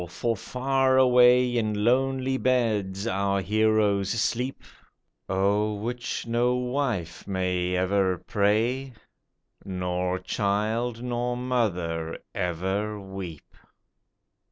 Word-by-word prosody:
for 115 +6 -1
far 130 +3 +1
away 125 -1 +5
In 105 -3 0
lonely 130 +2 +2
beds 110 -7 0
our 100 -2 0
heroes 105 -1 +2
sleep, 125 +5 -1 0.7
O'er 100 +3 +1
which 120 +2 -4
no 120 +2 +1
wife 125 - -2
may 90 -2 -1
ever 95 0 +1
pray. 115 +8 0 0.7
Nor 90 -1 -2
child 110 +5 -1
nor 120 0 -2
mother 90 -10 -1 0.2
ever 95 +5 -2
weep. 95 -5 -9
105 Hz, 90 wpm, -26 LUFS, 95-125 Hz, 0.7 s, away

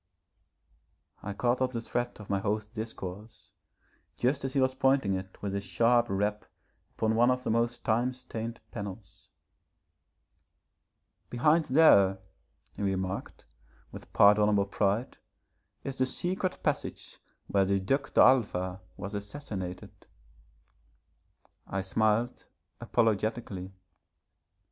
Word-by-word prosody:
I 100 - -5
caught 120 +4 0
up 130 0 +1
the 115 - -2
thread 120 +1 -3
of 105 - -10
my 100 - 0
host's 105 +1 -2
discourse 110 -2 -8 0.7
just 130 +3 0
as 135 -1 -2
he - - +3
was 130 0 +2
pointing 130 -6 +2
it 95 0 -6
with 100 -1 -2
a 100 - -1
sharp 115 +6 +2
rap 105 +2 -1 0.5
upon 110 0 +1
one 120 +2 +4
of 125 0 0
the - - -1
most 115 +1 0
time 120 +3 +2
stained 115 -2 -6
panels. 100 -2 -8 2.0
'Behind 150 +7 +3
there,' 100 -10 +5 0.6
he - - -7
remarked, 95 -1 -3 0.5
with - - -11
pardonable 105 0 +5
pride, 100 +4 -1 0.6
'is 135 -1 -5
the 130 - +3
secret 185 +6 -2
passage - - -3 0.3
where 100 -1 +2
the 100 +1 +1
Duc 135 +8 -1
d'Alva 95 -8 +3 0.2
was 100 +2 -6
assassinated.' 100 -4 -7 1.6
I 95 - -2
smiled 110 +5 0 0.3
apologetically. 110 -4 -1
110 Hz, 115 wpm, -29 LUFS, 100-125 Hz, 2.0 s, there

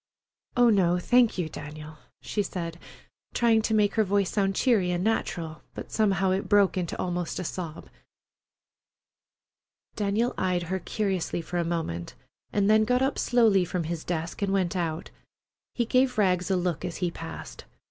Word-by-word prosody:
"Oh, 240 -1 +6
no, 180 -4 +3
thank 240 +5 +3
you, 175 -3 -1
Daniel," 150 0 -9 0.2
she 210 - -1
said, 170 -4 -5 0.6
trying 230 -2 +4
to 220 0 0
make 210 -1 +3
her 220 - +3
voice 200 -1 +1
sound 195 -2 +1
cheery 215 -8 +2
and 175 0 -1
natural, 170 -7 -2
but - - -8
somehow 195 -3 +2
it 190 +1 -1
broke 205 -2 +4
into 180 -3 -2
almost 175 -1 -2
a 185 - -3
sob. 170 -2 -6 2.1
Daniel 215 +3 0
eyed 180 -2 0
her 190 +3 -2
curiously 190 -4 -2
for 175 +1 -3
a - - +1
moment, 165 - -3 0.4
and 200 -1 +2
then 215 +1 +5
got 250 +3 +2
up 270 - 0
slowly 225 -6 +4
from 180 0 -2
his 160 0 -4
desk 170 +1 -4
and 200 -1 0
went 190 -2 0
out. 165 -2 -3 0.6
He 240 - +1
gave 255 +1 +2
Rags 185 -3 +2
a 190 - +2
look 180 -2 -1
as 180 -2 -4
he 180 -2 -1
passed. 165 -1 -8
185 Hz, 170 wpm, -27 LUFS, 170-215 Hz, 2.1 s, Oh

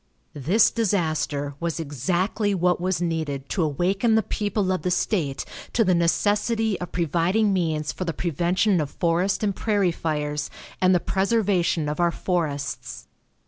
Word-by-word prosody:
This 170 - +3
disaster 155 -9 -1
was 170 -1 -2
exactly 180 - -1
what 180 -1 +1
was 180 -1 0
needed 155 -5 -2
to 190 - -1
awaken 185 - +1
the 220 - +3
people 205 -2 -1
of 185 - -1
the 180 - -1
state 170 -6 -1 0.3
to 230 - +3
the 185 -3 +3
necessity 205 +5 +1
of 180 - -6
providing 175 +5 +1
means 160 -5 0
for - - -5
the 170 - -1
prevention 175 +4 +1
of 145 - -3
forest 175 +7 0
and 200 -2 0
prairie 205 -5 +1
fires 150 -2 -2 0.3
and 185 0 +5
the - - +4
preservation 190 -5 +1
of 150 +2 -3
our 175 0 +4
forests. 155 -6 -3
175 Hz, 150 wpm, -24 LUFS, 160-200 Hz, 0.3 s, and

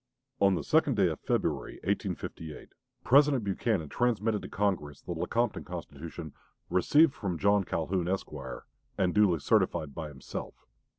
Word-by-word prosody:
On 100 -1 +4
the 80 - -3
second - - +3
day - - +4
of - - -4
February, - - -1
1858, 80 -2 -4 0.3
President 135 +1 +5
Buchanan 100 -3 0
transmitted 110 - 0
to - - -8
Congress 90 -9 -1
the - - -8
Lecompton 120 -1 -1
Constitution, 85 -2 -7 0.4
"received 140 - +5
from 95 -9 -3
J. 100 +3 +3
Calhoun, 85 +2 -1
Esq.," 95 +1 -2 0.7
and 90 -2 +2
"duly 105 -5 +4
certified 85 -4 +1
by 75 - -5
himself." 70 -2 -8
95 Hz, 135 wpm, -30 LUFS, 80-105 Hz, 0.7 s, President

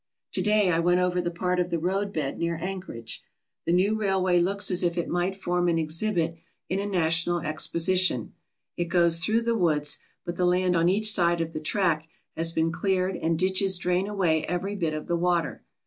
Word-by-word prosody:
To - - 0
day 210 -3 +3
I 165 - +1
went 175 +1 +3
over 180 0 +1
the 175 - -2
part 180 +1 -1
of 175 0 0
the 170 - -1
roadbed 180 -4 -2
near 170 0 -1
An 185 +3 -4
chorage. 115 -10 -6 0.5
The - - +2
new 190 +5 +3
railway 190 -3 +2
looks 195 +3 +1
as 180 - +1
if 175 -1 0
it 170 - -1
might 175 +2 -1
form 175 -2 -1
an 165 - +1
exhibit 165 +1 0 0.3
in 190 - -1
a 200 - -2
national 170 -2 +1
exposition. 165 - +1 0.4
It 175 - -1
goes 170 -1 +3
through 220 +7 +1
the 235 0 +1
woods, 155 -8 +1 0.3
but 175 -1 -5
the 180 - +2
land 180 0 +2
on 170 +1 +3
each 215 +3 +2
side 170 -2 +2
of 165 0 -3
the - - -3
track 160 -1 0 0.3
has 165 0 0
been 165 0 0
cleared 185 +1 0
and 165 -1 -1
ditches 190 +1 +2
drain 180 +2 0
away 180 -7 +1
every 180 +3 -2
bit 165 -5 -2
of 155 - -5
the 175 - -1
water. 170 -2 0
175 Hz, 205 wpm, -26 LUFS, 165-190 Hz, 0.5 s, day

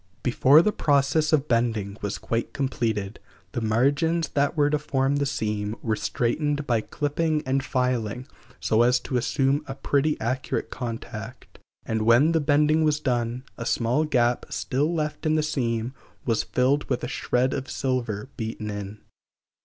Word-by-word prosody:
Before 135 +5 +5
the 210 - +2
process 145 -1 +2
of 150 -2 +2
bending 115 -4 0
was 100 -1 -3
quite 115 0 -3
completed 110 -7 -2 0.3
the 120 - -3
margins 140 +8 +1
that 145 +3 0
were 145 -1 +3
to 150 - +2
form 140 -1 0
the 140 0 0
seam 105 -5 -2
were 110 -2 +1
straightened 145 +5 -1
by 115 -5 +1
clipping 150 +4 -1
and 135 +1 0
filing 125 -3 -1 0.3
so 110 +1 +2
as 125 +1 +4
to 130 - -4
assume 135 +3 +1
a 135 - -5
pretty 145 +2 0
accurate 130 +4 -2
contact, 115 -4 -7 0.3
and 110 -1 -1
when 120 +8 +5
the 165 -1 +2
bending 150 +2 +3
was 150 -1 +2
done, 120 -2 -1 0.2
a 115 - -4
small 120 +6 +1
gap 125 -5 +1
still 145 +5 -1
left 155 -1 -2
in 155 - +3
the 155 - +2
seam 120 -5 -1 0.3
was 115 -3 +2
filled 135 +3 +1
with 125 - -1
a - - -1
shred 125 0 0
of 135 -1 -4
silver 125 -5 -2
beaten 110 -2 -4
in. 105 0 -7
130 Hz, 160 wpm, -25 LUFS, 115-145 Hz, 0.3 s, Before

